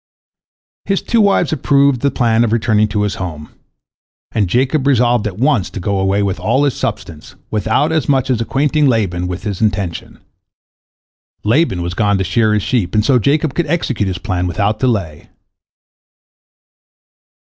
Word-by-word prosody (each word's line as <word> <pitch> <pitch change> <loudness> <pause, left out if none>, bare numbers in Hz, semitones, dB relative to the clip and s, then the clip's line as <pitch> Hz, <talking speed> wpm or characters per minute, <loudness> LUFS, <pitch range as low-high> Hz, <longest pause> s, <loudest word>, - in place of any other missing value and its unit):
His 195 -1 -1
two 230 -1 +2
wives 195 -6 +2
approved 140 -2 +2
the 140 - +2
plan 115 -3 +1
of 115 - 0
returning 110 -2 +2
to 105 -1 -1
his 105 -1 -1
home, 75 -5 -6 0.8
and 105 -4 0
Jacob 130 - +1
resolved 120 -4 +2
at 95 -3 -7
once 130 - +1
to - - -7
go 100 +2 -1
away 95 +1 +1
with 100 -1 -2
all 135 - +1
his 140 -3 +1
substance, 75 -3 -6 0.2
without 110 - 0
as 160 -3 -1
much 135 -1 +1
as 120 -3 0
acquainting 145 +4 +1
Laban 95 -8 0
with 90 +2 -5
his 100 -4 -4
intention. 95 -5 -2 1.2
Laban 110 - +1
was 85 +1 -4
gone 100 +1 +1
to 95 - 0
shear 110 +3 +1
his 105 - -1
sheep, 110 -7 -1
and 105 0 +2
so 130 -3 +3
Jacob 145 +5 +1
could 170 +2 -1
execute 140 - -1
his 95 -1 -3
plan 90 -2 -2
without 105 +3 -1
delay. 100 - -2
110 Hz, 165 wpm, -16 LUFS, 95-135 Hz, 1.2 s, so